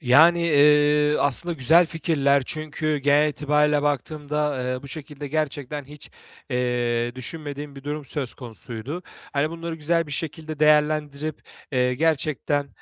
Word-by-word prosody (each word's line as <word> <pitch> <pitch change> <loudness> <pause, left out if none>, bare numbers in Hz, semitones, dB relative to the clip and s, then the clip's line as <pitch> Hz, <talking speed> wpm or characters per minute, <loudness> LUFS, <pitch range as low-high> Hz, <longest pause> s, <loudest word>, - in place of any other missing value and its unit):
Yani, 160 +6 +6
iii, 150 0 +4
aslında 155 +5 +2
güzel 160 +4 +4
fikirler 140 -4 +1
çünkü 155 0 -2
genel 145 +2 +3
itibarıyla 150 0 +1
baktığımda, 145 -1 -1
eee, 125 0 -3
bu 140 - -10
şekilde 145 -1 -7
gerçekten 145 -1 -3
hiç, 145 +2 -13 0.4
eee, 120 -1 0
düşünmediğim 145 +2 -7
bir 135 - -11
durum 150 0 -4
söz 135 -3 -4
konusuydu. 125 +5 -7 0.3
Hani, 145 +2 0
bunları 165 0 -5
güzel 165 +1 0
bir 145 - -8
şekilde 155 0 -5
değerlendirip, 150 0 +2 0.3
eee, 125 0 +2
gerçekten, 145 -1 0
150 Hz, 130 wpm, -24 LUFS, 140-155 Hz, 0.4 s, Yani